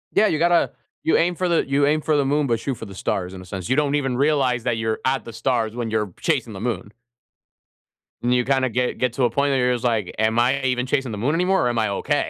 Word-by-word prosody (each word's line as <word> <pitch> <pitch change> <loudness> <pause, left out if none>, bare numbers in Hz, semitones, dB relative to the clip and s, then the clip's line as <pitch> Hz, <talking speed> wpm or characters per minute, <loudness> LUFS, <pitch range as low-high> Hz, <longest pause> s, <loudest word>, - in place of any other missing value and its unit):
Yeah, 215 - +5
you 155 - 0
gotta 170 0 +3 0.3
you - - +3
aim 175 +1 +1
for 180 0 -1
the 165 -4 +1
you 140 +1 +2
aim 155 +1 +2
for 155 -1 +1
the 140 - +2
moon, 145 +1 +1
but 115 -2 +1
shoot 135 +2 -3
for 115 - -8
the 100 -1 -11
stars 95 -2 -2
in 95 - -8
a - - -12
sense. 95 -3 -6
You 130 - +3
don't 145 -1 +1
even 135 -4 0
realize 135 -5 +2
that 120 -2 0
you're 110 -1 -1
at 130 +1 0
the 115 - -9
stars 115 -2 -1
when 120 -2 -3
you're 105 -5 -1
chasing 110 - 0
the 95 - -8
moon. 105 -3 -3 1.3
And 120 +1 +1
you 125 -1 +2
kind 135 -1 +2
of 120 - -2
get 125 +1 -1
get 125 -2 0
to 130 - -1
a 120 - +4
point 140 0 +1
where 135 - +2
you're 125 0 +2
just 120 - -4
like, 110 -6 0
"Am 110 +1 +2
I 130 +3 +2
even 125 -1 0
chasing 135 -2 -1
the 105 - -5
moon 130 +8 0
anymore 180 -4 +2
or - - +2
am 120 -1 -1
I 110 - +1
okay?" 100 - -1
125 Hz, 285 wpm, -22 LUFS, 110-140 Hz, 1.3 s, Yeah